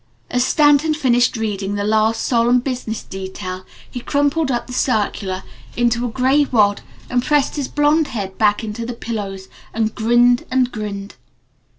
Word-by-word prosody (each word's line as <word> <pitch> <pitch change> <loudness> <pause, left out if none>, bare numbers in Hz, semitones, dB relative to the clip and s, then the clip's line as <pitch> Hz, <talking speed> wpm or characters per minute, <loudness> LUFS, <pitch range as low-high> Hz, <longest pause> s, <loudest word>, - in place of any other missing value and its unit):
As 245 0 +2
Stanton 295 +2 +3
finished 245 -5 +2
reading 205 -2 -2
the 205 - -2
last 220 +1 +1
solemn 240 0 +3
business 245 -4 -4
detail 190 -1 -7 0.2
he 245 - -7
crumpled 285 +4 0
up 240 -2 -1
the 250 - -9
circular 205 -6 -1 0.3
into 235 -1 +2
a - - -2
little 235 - -9
gray 270 +3 +4
wad, 210 -6 +2 0.3
and 245 -1 0
pressed 295 -1 +1
his 285 -3 -2
blond 295 +1 +2
head 195 -4 -5
back 210 0 +2
into 220 +1 -5
the 245 +1 -4
pillows 200 -5 -5 0.3
and 220 -1 0
grinned 240 +2 +3
and 255 -1 +1
grinned. 205 -2 -6
235 Hz, 165 wpm, -19 LUFS, 210-255 Hz, 0.3 s, gray